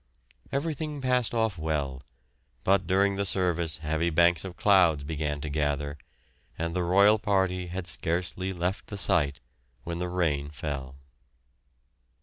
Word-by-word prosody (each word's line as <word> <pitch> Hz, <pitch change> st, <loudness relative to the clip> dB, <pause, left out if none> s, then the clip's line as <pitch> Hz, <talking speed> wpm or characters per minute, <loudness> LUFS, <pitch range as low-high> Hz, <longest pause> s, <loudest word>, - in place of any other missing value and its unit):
Everything 150 Hz, +1 st, -2 dB
passed 125 Hz, -3 st, +1 dB
off 110 Hz, -6 st, 0 dB
well, 70 Hz, -4 st, -2 dB, 0.6 s
but 100 Hz, +1 st, +2 dB
during 100 Hz, +1 st, +2 dB
the 100 Hz, -, +1 dB
service 85 Hz, -4 st, +1 dB
heavy 80 Hz, +2 st, -1 dB
banks 85 Hz, +1 st, +3 dB
of 95 Hz, -2 st, -8 dB
clouds 90 Hz, -8 st, +4 dB
began 75 Hz, -1 st, -3 dB
to 75 Hz, -, -4 dB
gather, 75 Hz, -1 st, -1 dB, 0.6 s
and 85 Hz, +1 st, -3 dB
the 90 Hz, -, +1 dB
royal 100 Hz, +5 st, +5 dB
party 95 Hz, -3 st, 0 dB
had 90 Hz, +1 st, -5 dB
scarcely 90 Hz, +2 st, -2 dB
left 90 Hz, +2 st, -3 dB
the 100 Hz, -, -6 dB
site 70 Hz, -8 st, +2 dB, 0.4 s
when 85 Hz, +2 st, -4 dB
the 90 Hz, 0 st, -2 dB
rain 75 Hz, -6 st, 0 dB
fell. 70 Hz, -3 st, -5 dB
85 Hz, 135 wpm, -28 LUFS, 75-95 Hz, 0.6 s, royal